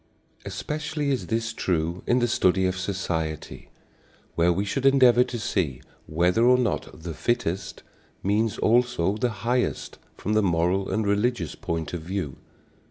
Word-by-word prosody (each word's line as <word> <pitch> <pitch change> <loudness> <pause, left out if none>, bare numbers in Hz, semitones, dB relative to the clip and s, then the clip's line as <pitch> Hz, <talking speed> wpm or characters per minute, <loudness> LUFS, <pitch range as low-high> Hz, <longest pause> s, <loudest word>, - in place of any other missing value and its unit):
Especially 150 -1 -3
is 130 - -2
this 115 0 -1
true 85 -3 -1
in 120 - +3
the 120 -1 +2
study 95 -5 +2
of 95 0 0
society, 90 -5 -4 0.6
where 85 +1 +3
we 95 +4 0
should 130 +6 -2
endeavor 130 -3 +6
to 125 - -5
see 90 - -1 0.3
whether 90 +7 +2
or 125 +1 +6
not 115 -9 -2
the 85 -1 -4
"fittest" 100 -1 -2 0.4
means 105 +3 +1
also 115 -5 +2
the 120 +3 0 0.2
highest 125 +1 -1 0.2
from 105 - -2
the 110 - +4
moral 90 +1 +1
and 110 -1 0
religious 105 +4 0
point 80 -1 -4
of 85 - -3
view. 85 -5 -4
100 Hz, 150 wpm, -25 LUFS, 85-120 Hz, 0.6 s, endeavor